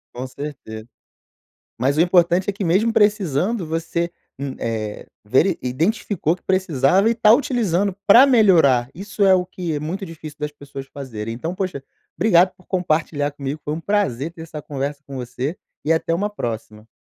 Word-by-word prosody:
Com 125 Hz, +2 st, -4 dB
certeza. 125 Hz, -6 st, -8 dB, 0.9 s
Mas 135 Hz, +5 st, +1 dB
o -, -, +5 dB
importante 175 Hz, +1 st, +3 dB
é -, -, 0 dB
que 200 Hz, -, -4 dB
mesmo 195 Hz, +7 st, +2 dB
precisando, 205 Hz, -, +1 dB
você, 165 Hz, +1 st, -2 dB, 0.3 s
hum, 140 Hz, -1 st, -4 dB
eh, 110 Hz, -2 st, -4 dB, 0.2 s
veri 155 Hz, -, +3 dB
identificou 165 Hz, -, 0 dB
que 180 Hz, -, -11 dB
precisava 185 Hz, -, +2 dB
e 235 Hz, -, +1 dB
tá 220 Hz, -1 st, +6 dB
utilizando 210 Hz, -, +1 dB
pra 235 Hz, +6 st, +9 dB
melhorar, 170 Hz, -, +4 dB
isso 200 Hz, +3 st, -1 dB
é 190 Hz, -, +6 dB
o 180 Hz, -1 st, 0 dB
que 180 Hz, -2 st, -4 dB
é -, -, -2 dB
muito 185 Hz, +6 st, -4 dB
difícil 155 Hz, -3 st, -10 dB
das 150 Hz, 0 st, -3 dB
pessoas 140 Hz, -2 st, -9 dB
fazerem. 115 Hz, -6 st, -6 dB
Então, 160 Hz, +9 st, -4 dB
poxa, 185 Hz, -7 st, -4 dB, 0.3 s
obrigado 180 Hz, 0 st, +4 dB
por 185 Hz, -, -23 dB
compartilhar 155 Hz, -5 st, 0 dB
comigo, 140 Hz, +1 st, -5 dB
foi 150 Hz, -, -2 dB
um 160 Hz, -, -5 dB
prazer 165 Hz, -, 0 dB
ter 165 Hz, -1 st, -10 dB
essa 155 Hz, -2 st, -8 dB
conversa 140 Hz, 0 st, -4 dB
com 140 Hz, -, -9 dB
você 130 Hz, +6 st, -4 dB, 0.3 s
e 155 Hz, -, +1 dB
até 165 Hz, 0 st, +1 dB
uma 205 Hz, +4 st, -1 dB
próxima. 110 Hz, -, -6 dB
165 Hz, 175 wpm, -21 LUFS, 140-190 Hz, 0.9 s, pra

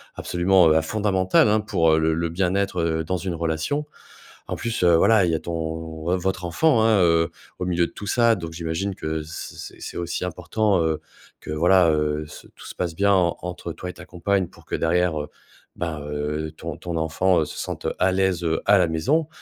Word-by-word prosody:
absolument, 90 Hz, 0 st, +3 dB
heu, 80 Hz, -, +4 dB
hein, 80 Hz, -, +4 dB
fondamental, 95 Hz, +2 st, +2 dB
hein, 110 Hz, -, +3 dB
pour 80 Hz, -7 st, +2 dB
le 80 Hz, 0 st, +2 dB
le 85 Hz, +1 st, -1 dB
bien-être, 95 Hz, +2 st, 0 dB
heu, 80 Hz, -1 st, 0 dB
dans 90 Hz, +3 st, -2 dB
une 90 Hz, -1 st, -4 dB
relation. 85 Hz, -, -1 dB, 0.6 s
En -, -, -3 dB
plus, 115 Hz, -5 st, -2 dB
heu, 85 Hz, -1 st, +6 dB
voilà, 100 Hz, +4 st, +5 dB
il 85 Hz, -, +1 dB
y 80 Hz, -, +1 dB
a -, -, -1 dB
ton 85 Hz, +1 st, -6 dB, 0.5 s
vo 90 Hz, +2 st, +1 dB
votre 90 Hz, 0 st, -2 dB
enfant, 120 Hz, -, +3 dB
hein, 110 Hz, -3 st, +4 dB
heu, 85 Hz, -1 st, +3 dB, 0.3 s
au 90 Hz, -, -2 dB
milieu 85 Hz, -1 st, +1 dB
de -, -, -17 dB
tout 105 Hz, -, -8 dB
ça. 115 Hz, 0 st, +4 dB
Donc, 85 Hz, -2 st, -7 dB
j'imagine 85 Hz, +4 st, -3 dB
que 80 Hz, -1 st, -3 dB
c 80 Hz, -, -8 dB
c'est -, -, -9 dB
c'est -, -, -7 dB
aussi 85 Hz, +1 st, -3 dB
important, 90 Hz, +3 st, 0 dB
heu, 80 Hz, -1 st, 0 dB, 0.4 s
que -, -, -7 dB
voilà, 85 Hz, +3 st, +4 dB
heu, 75 Hz, 0 st, 0 dB
c -, -, -12 dB
tout -, -, -13 dB
se -, -, -7 dB
passe 85 Hz, -3 st, -3 dB
bien, 100 Hz, +3 st, +3 dB
en 90 Hz, -3 st, +2 dB
entre 90 Hz, -1 st, -5 dB
toi 90 Hz, -, -7 dB
et -, -, -6 dB
ta -, -, -12 dB
compagne 95 Hz, +1 st, 0 dB
pour -, -, -19 dB
que -, -, -11 dB
derrière, 85 Hz, -1 st, +1 dB
heu, 75 Hz, -, -6 dB, 0.5 s
ben, 80 Hz, -3 st, -3 dB
heu, 75 Hz, +1 st, -3 dB
ton 85 Hz, -1 st, -6 dB
ton 85 Hz, -2 st, -4 dB
enfant, 80 Hz, +2 st, +2 dB
heu, -, -, 0 dB
se -, -, -9 dB
sente -, -, -4 dB
à 95 Hz, 0 st, +3 dB
l'aise, 95 Hz, -2 st, +1 dB
heu, 80 Hz, -1 st, 0 dB
à 105 Hz, -, +6 dB
la 90 Hz, -, +3 dB
maison, 140 Hz, -, +1 dB
85 Hz, 220 wpm, -23 LUFS, 80-95 Hz, 0.6 s, heu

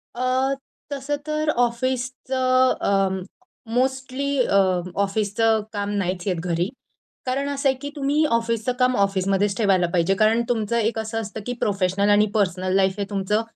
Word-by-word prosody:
अ, 255 Hz, +2 st, +1 dB, 0.4 s
तसं 285 Hz, +1 st, -2 dB
तर 305 Hz, 0 st, 0 dB
ऑफिसचं 255 Hz, +1 st, +1 dB
अ, 195 Hz, -1 st, +2 dB, 0.6 s
मोस्टली 265 Hz, +2 st, -1 dB
अ, -, -, -1 dB, 0.5 s
ऑफिसचं 215 Hz, +2 st, +1 dB
काम 205 Hz, 0 st, -2 dB
नाहीच 185 Hz, 0 st, -2 dB
येत 185 Hz, -, +1 dB
घरी. 175 Hz, +2 st, 0 dB, 0.6 s
कारण 275 Hz, +2 st, -1 dB
असं 275 Hz, -1 st, +1 dB
आहे 265 Hz, -, 0 dB
की 285 Hz, -, -4 dB
तुम्ही 290 Hz, +2 st, +1 dB
ऑफिसचं 230 Hz, -1 st, 0 dB
काम 250 Hz, 0 st, +3 dB
ऑफिसमध्येच 195 Hz, 0 st, +1 dB
ठेवायला 190 Hz, -5 st, +3 dB
पाहिजे. 180 Hz, +3 st, +2 dB
कारण 220 Hz, +3 st, +3 dB
तुमचं 235 Hz, -1 st, 0 dB
एक 225 Hz, 0 st, 0 dB
असं 220 Hz, +1 st, -3 dB
असतं 215 Hz, 0 st, -7 dB
की 245 Hz, -, -2 dB
प्रोफेशनल 200 Hz, 0 st, +1 dB
आणि 205 Hz, +1 st, +5 dB
पर्सनल 185 Hz, -2 st, 0 dB
लाईफ 190 Hz, -1 st, +3 dB
हे -, -, +1 dB
तुमचं 205 Hz, +2 st, 0 dB
225 Hz, 150 wpm, -23 LUFS, 195-255 Hz, 0.6 s, आणि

